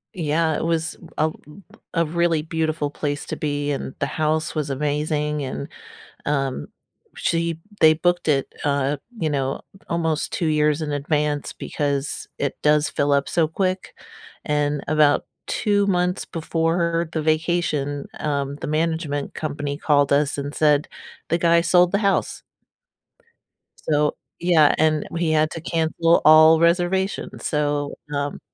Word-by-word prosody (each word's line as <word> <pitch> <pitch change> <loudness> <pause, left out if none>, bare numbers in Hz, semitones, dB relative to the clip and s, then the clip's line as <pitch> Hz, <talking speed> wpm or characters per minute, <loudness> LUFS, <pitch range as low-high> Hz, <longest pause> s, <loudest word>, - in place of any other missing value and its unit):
Yeah, 160 -1 +1
it - - -3
was 165 0 -1 0.2
a - - +2
l - - -14 0.6
a 170 - +3
really 165 -1 +1
beautiful 155 -2 -2
place 145 -1 -3
to - - -3
be, 145 -2 -2
and 135 -1 -4
the - - +1
house 155 +2 -1
was 150 -2 -2
amazing, 150 +1 -1
and, 75 - -5 0.6
um, 135 -2 -1 0.5
she 165 -1 -1 0.2
they 155 0 +7
booked 175 +1 0
it, 140 -3 +1
uh, 140 0 +1 0.2
you 160 -6 -1
know, 135 -2 -1 0.3
almost 160 -2 -1
2 165 - 0
years 150 0 +2
in 150 -1 -3
advance 145 0 -1
because 145 -1 -3
it 140 - -2
does 150 0 +3
fill 145 0 0
up 140 -1 +1
so 165 -3 +2
quick 185 +3 -2 0.5
and 150 -1 0
about 150 -1 +3 0.2
2 205 -1 +1
months 180 -1 0
before 165 +1 0
the 160 - -1
vacation, 155 -3 0
um, 140 -1 -2
the - - -6
management 155 -2 -1
company 145 -2 -4
called 145 -2 +2
us 145 0 +2
and 140 +1 -4
said 150 -2 +2 0.4
the 170 - +2
guy 170 0 +4
sold 180 +1 +4
the 200 - +3
house. 200 -3 0 1.5
So 150 -1 +2 0.2
Yeah, 165 -4 +4
and 155 -1 +2
we 170 -1 0
had 155 0 +2
to 165 - -6
cancel 165 0 +2
all 155 +1 +8
reservations, 175 +3 0
so, 145 -1 -1 0.2
um 145 0 -2
155 Hz, 145 wpm, -22 LUFS, 145-165 Hz, 1.5 s, all